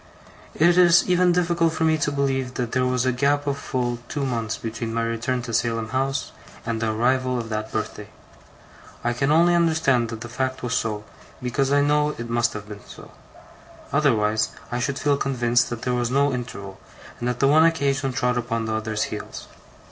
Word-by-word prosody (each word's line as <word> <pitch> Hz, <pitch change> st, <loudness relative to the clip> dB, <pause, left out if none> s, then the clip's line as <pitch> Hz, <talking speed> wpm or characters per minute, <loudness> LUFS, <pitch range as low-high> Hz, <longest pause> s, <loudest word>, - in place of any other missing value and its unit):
It 175 Hz, +3 st, +4 dB
is 175 Hz, -1 st, +6 dB
even 180 Hz, 0 st, +4 dB
difficult 170 Hz, -2 st, +1 dB
for 160 Hz, -, -1 dB
me 160 Hz, 0 st, +4 dB
to 145 Hz, -, 0 dB
believe 135 Hz, -2 st, -1 dB
that 120 Hz, -2 st, -2 dB
there 125 Hz, -1 st, +1 dB
was 125 Hz, 0 st, 0 dB
a 130 Hz, -, +3 dB
gap 140 Hz, +3 st, +1 dB
of 140 Hz, -1 st, 0 dB
full 120 Hz, -4 st, -2 dB
two 140 Hz, -2 st, -2 dB
months 115 Hz, -4 st, -2 dB
between 115 Hz, 0 st, -5 dB
my 115 Hz, -, 0 dB
return 115 Hz, +2 st, -2 dB
to 120 Hz, -2 st, -6 dB
Salem 115 Hz, -1 st, 0 dB
House 135 Hz, +2 st, -1 dB, 0.3 s
and 115 Hz, -1 st, -2 dB
the 110 Hz, -1 st, +1 dB
arrival 125 Hz, +3 st, +1 dB
of 115 Hz, -2 st, -4 dB
that 110 Hz, 0 st, -3 dB
birthday. 105 Hz, -1 st, -4 dB, 1.0 s
I 120 Hz, 0 st, +1 dB
can 135 Hz, +4 st, 0 dB
only 170 Hz, +3 st, +5 dB
understand 160 Hz, -8 st, +2 dB
that 115 Hz, 0 st, -6 dB
the 120 Hz, -, -6 dB
fact 130 Hz, +2 st, -3 dB
was 125 Hz, -1 st, -2 dB
so, 110 Hz, -4 st, -1 dB, 0.4 s
because 130 Hz, +2 st, -1 dB
I 145 Hz, 0 st, +4 dB
know 150 Hz, +1 st, +2 dB
it 120 Hz, 0 st, -6 dB
must 120 Hz, 0 st, +1 dB
have 105 Hz, 0 st, -7 dB
been 105 Hz, -1 st, -10 dB
so; -, -, -12 dB, 0.8 s
otherwise 110 Hz, -7 st, +2 dB, 0.2 s
I 120 Hz, -, -1 dB
should 135 Hz, +3 st, -1 dB
feel 145 Hz, -1 st, +1 dB
convinced 120 Hz, -3 st, +1 dB
that 115 Hz, -1 st, -6 dB
there 125 Hz, -, 0 dB
was 120 Hz, -1 st, 0 dB
no 140 Hz, +2 st, +2 dB
interval, 100 Hz, -6 st, -6 dB, 0.4 s
and 120 Hz, -, -2 dB
that 125 Hz, -, -3 dB
the 135 Hz, -, +4 dB
one 155 Hz, +3 st, +6 dB
occasion 140 Hz, -4 st, +1 dB
trod 125 Hz, -1 st, 0 dB
upon 115 Hz, -1 st, -2 dB
the 110 Hz, -, -2 dB
other's 110 Hz, 0 st, -1 dB
heels. -, -, -6 dB
125 Hz, 200 wpm, -23 LUFS, 115-140 Hz, 1.0 s, is